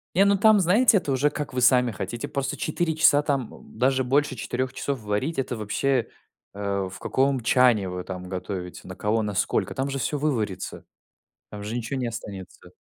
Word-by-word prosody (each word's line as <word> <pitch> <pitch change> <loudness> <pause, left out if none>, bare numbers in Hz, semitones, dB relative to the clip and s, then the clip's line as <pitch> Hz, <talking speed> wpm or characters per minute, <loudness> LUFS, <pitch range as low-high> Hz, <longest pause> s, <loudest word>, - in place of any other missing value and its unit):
Не, 195 +2 +5
ну 200 0 +4
там, 215 0 +6
знаете, 205 +5 +5
это 145 -7 -2
уже 140 +3 +2
как 145 -3 -5
вы 125 - -1
сами 125 -1 +5
хотите, 105 +3 -5
просто 135 -1 -3
4 160 0 -1
часа 145 -2 +5
там, 135 -5 -2
м, - - -15
даже 130 +2 +2
больше 140 +1 +1
4 125 +3 -3
часов 140 -4 -3
варить- 105 +10 -2
это 125 -2 -2
вообще, 115 +4 0 0.5
э, 100 -2 -2
в - - -9
каком 135 -1 +1
чане 115 -5 +3
вы 90 0 -5
там 90 -1 -7
готовите, 90 -1 -6
на 95 - -7
кого, 110 +2 0
на 105 -2 -3
сколько? - - 0
Там 135 +1 -1
же 135 - -2
всё 145 +4 -1
выварится. 115 -10 -2 0.7
Там 105 -1 -7
же 110 +3 -4
ничего 120 +3 -3
не 125 - -1
останется. 100 -5 -8
125 Hz, 195 wpm, -25 LUFS, 105-140 Hz, 0.7 s, там